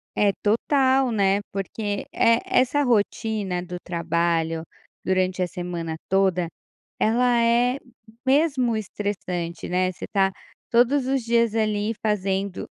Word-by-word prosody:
É, 205 Hz, -1 st, +3 dB
total, 260 Hz, +4 st, +3 dB
né, 200 Hz, -2 st, +2 dB
porque, 205 Hz, +1 st, -3 dB
eh, 230 Hz, 0 st, +4 dB
essa 260 Hz, +3 st, +2 dB
rotina 210 Hz, -5 st, 0 dB
do 180 Hz, 0 st, -6 dB
trabalho 170 Hz, -1 st, 0 dB, 0.4 s
durante 185 Hz, 0 st, 0 dB
a 180 Hz, -, +1 dB
semana 175 Hz, -2 st, -5 dB
toda, 190 Hz, -2 st, +2 dB, 0.5 s
ela 240 Hz, +2 st, +3 dB
é 240 Hz, +3 st, +3 dB, 0.5 s
mesmo 265 Hz, -4 st, +2 dB
estressante, 185 Hz, -5 st, -4 dB
né, 185 Hz, +1 st, +1 dB
você -, -, -8 dB
tá 195 Hz, -2 st, +2 dB, 0.4 s
todos 250 Hz, +3 st, +3 dB
os 270 Hz, -1 st, 0 dB
dias 230 Hz, -1 st, +2 dB
ali 215 Hz, -1 st, 0 dB
fazendo, 195 Hz, -2 st, -1 dB
205 Hz, 115 wpm, -24 LUFS, 185-235 Hz, 0.5 s, eh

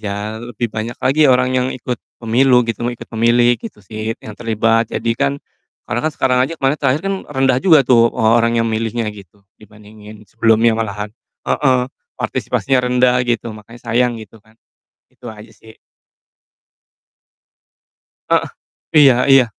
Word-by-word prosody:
Ya 105 Hz, +1 st, -5 dB
lebih 120 Hz, 0 st, -4 dB
banyak 110 Hz, +2 st, -5 dB
lagi 145 Hz, +2 st, +3 dB
orang 125 Hz, 0 st, +2 dB
yang 130 Hz, 0 st, +1 dB
ikut 125 Hz, -1 st, -5 dB, 0.2 s
pemilu 125 Hz, +2 st, +3 dB
gitu, 115 Hz, -, -4 dB
mau 120 Hz, -, -1 dB
ikut -, -, -11 dB
memilih 120 Hz, +2 st, +3 dB
gitu 230 Hz, -, -9 dB
sih 110 Hz, +2 st, -5 dB
yang 110 Hz, -, -8 dB
terlibat, 115 Hz, 0 st, 0 dB
jadi 115 Hz, -, -2 dB
kan 140 Hz, 0 st, +1 dB, 0.5 s
karena 120 Hz, -, -2 dB
kan -, -, -7 dB
sekarang 125 Hz, -1 st, +1 dB
aja 135 Hz, +6 st, 0 dB
kemarin 135 Hz, +1 st, 0 dB
terakhir 140 Hz, +1 st, +1 dB
kan 195 Hz, 0 st, -1 dB
rendah 135 Hz, -2 st, +1 dB
juga 160 Hz, -6 st, +5 dB
tuh, 115 Hz, -2 st, +4 dB
eee, 110 Hz, -, +2 dB
orang 115 Hz, 0 st, +1 dB
yang 115 Hz, -, +1 dB
memilihnya 115 Hz, +1 st, -2 dB
gitu, 100 Hz, -1 st, -16 dB, 0.2 s
dibandingin 105 Hz, 0 st, -15 dB
sebelumnya 115 Hz, +1 st, +2 dB
malahan. 105 Hz, -1 st, -4 dB, 0.3 s
Heeh, 130 Hz, -3 st, +1 dB, 0.3 s
partisipasinya 135 Hz, -1 st, -1 dB
rendah 125 Hz, 0 st, +3 dB
gitu 120 Hz, -1 st, -1 dB
makanya 115 Hz, +3 st, -14 dB
sayang 120 Hz, 0 st, +1 dB
gitu 110 Hz, 0 st, -13 dB
kan, 110 Hz, +1 st, -26 dB, 0.5 s
itu 125 Hz, -, -16 dB
aja 110 Hz, +1 st, -13 dB
sih. 110 Hz, +1 st, -17 dB, 2.6 s
Heeh, -, -, +2 dB, 0.5 s
iya 140 Hz, -4 st, +7 dB, 0.2 s
iya. 135 Hz, -1 st, +7 dB
115 Hz, 155 wpm, -17 LUFS, 110-125 Hz, 2.6 s, iya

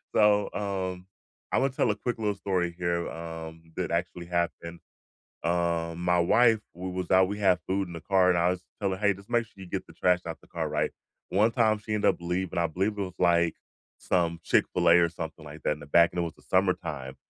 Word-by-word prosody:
so, 105 Hz, -1 st, +4 dB
um, 95 Hz, -2 st, -3 dB, 0.4 s
I -, -, +2 dB
wanna 135 Hz, 0 st, +1 dB
tell 120 Hz, -, +1 dB
a -, -, -2 dB
quick 120 Hz, +3 st, -3 dB
little 105 Hz, -2 st, 0 dB
story 90 Hz, -3 st, -1 dB
here, 85 Hz, -1 st, -1 dB
um, 80 Hz, 0 st, -8 dB
that -, -, -2 dB
actually 85 Hz, 0 st, -2 dB
happened. 85 Hz, -1 st, -2 dB, 0.6 s
Um, 85 Hz, 0 st, 0 dB
my 90 Hz, 0 st, +3 dB
wife 110 Hz, +5 st, +4 dB, 0.2 s
we 90 Hz, +1 st, -5 dB
was 90 Hz, 0 st, -4 dB
out, 95 Hz, 0 st, +6 dB
we 105 Hz, +1 st, -4 dB
had 95 Hz, -3 st, +3 dB
food 95 Hz, 0 st, 0 dB
in 85 Hz, -, -9 dB
the 85 Hz, -, -7 dB
car 95 Hz, 0 st, +3 dB
and 90 Hz, -, +3 dB
I 85 Hz, +1 st, +3 dB
was 90 Hz, 0 st, -2 dB, 0.2 s
telling, 95 Hz, -1 st, -1 dB
"Hey, 100 Hz, -1 st, +3 dB
just 100 Hz, +4 st, -15 dB
make 120 Hz, -1 st, +2 dB
sure -, -, -26 dB
you -, -, -10 dB
get -, -, -3 dB
the -, -, -14 dB
trash 90 Hz, -1 st, +2 dB
out 80 Hz, -, -6 dB
the -, -, -20 dB
car." -, -, -3 dB
Right? -, -, 0 dB, 0.4 s
One 105 Hz, +4 st, +3 dB
time 110 Hz, -3 st, +3 dB
she 110 Hz, +1 st, -5 dB
end 105 Hz, -, -1 dB
up -, -, +3 dB
leav 90 Hz, +2 st, -2 dB
and -, -, -1 dB
I 85 Hz, -, +2 dB
believe 95 Hz, +6 st, -1 dB
it -, -, -2 dB
was, 90 Hz, -2 st, -4 dB
like, 85 Hz, -2 st, +3 dB, 0.4 s
some 85 Hz, -2 st, 0 dB
Chick-fil-A 85 Hz, -, +4 dB
or 85 Hz, -1 st, +3 dB
something 80 Hz, -1 st, -7 dB
like 75 Hz, +1 st, -10 dB
that -, -, +2 dB
in 75 Hz, -, -10 dB
the -, -, -9 dB
back, 85 Hz, +3 st, +5 dB
and 90 Hz, -, -2 dB
it -, -, +2 dB
was 85 Hz, -, -4 dB
the -, -, -21 dB
summertime, 90 Hz, -8 st, 0 dB
90 Hz, 235 wpm, -28 LUFS, 85-100 Hz, 0.6 s, out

